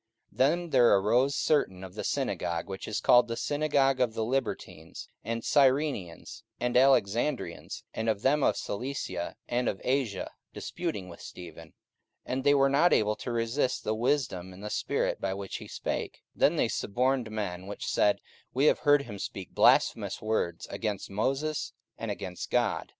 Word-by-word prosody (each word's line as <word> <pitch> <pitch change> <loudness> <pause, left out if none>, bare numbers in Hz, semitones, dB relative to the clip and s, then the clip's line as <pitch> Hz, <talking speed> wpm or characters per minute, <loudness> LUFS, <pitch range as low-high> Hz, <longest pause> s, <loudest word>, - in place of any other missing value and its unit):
44:006:009 - - -24
Then 170 +6 +2
there 120 -5 +6
arose 125 +8 +2
certain 95 -12 +1
of 95 -1 -9
the - - -5
synagogue, 85 -1 -2
which 95 -1 -6
is 110 - -2
called 120 0 +5
the 115 0 -4
synagogue 145 -2 +1
of 120 -3 +1
the 110 - -1
Libertines, 115 -10 -4 0.2
and 115 0 -3
Cyrenians, 135 - +1 0.2
and 125 0 -1
Alexandrians, 130 0 +1
and 110 0 -1
of 105 -2 -1
them 145 +3 +3
of - - +2
Cilicia 100 -6 -4
and 120 +1 0
of 95 - -4
Asia, 125 -7 -1 0.2
disputing 165 - -4
with 85 -1 -11
Stephen. 85 -2 -10 0.5
44:006:010 - - -2
And 130 +1 -1
they 145 +1 +5
were 135 0 +4
not 145 +6 +4
able 105 0 +3
to 125 - -5
resist 120 +3 0
the 110 - 0
wisdom 110 -7 -1
and 95 +2 -12
the 105 - -5
spirit - - -1
by 95 0 -1
which 100 -1 -5
he - - -10
spake. - - -3
44:006:011 - - -25 0.2
Then - - +4
they - - +2
suborned 125 +2 0
men, 95 -4 -4
which 100 - -6
said, 105 - +2 0.3
We 135 +3 +3
have - - +4
heard 145 -1 +4
him 105 -6 -8
speak 95 -1 -6
blasphemous - - +3
words 105 -6 -1
against 105 -1 -3
Moses, 135 +9 -1 0.3
and - - -4
against 90 -2 -5
God. - - 0
115 Hz, 175 wpm, -29 LUFS, 100-135 Hz, 0.5 s, there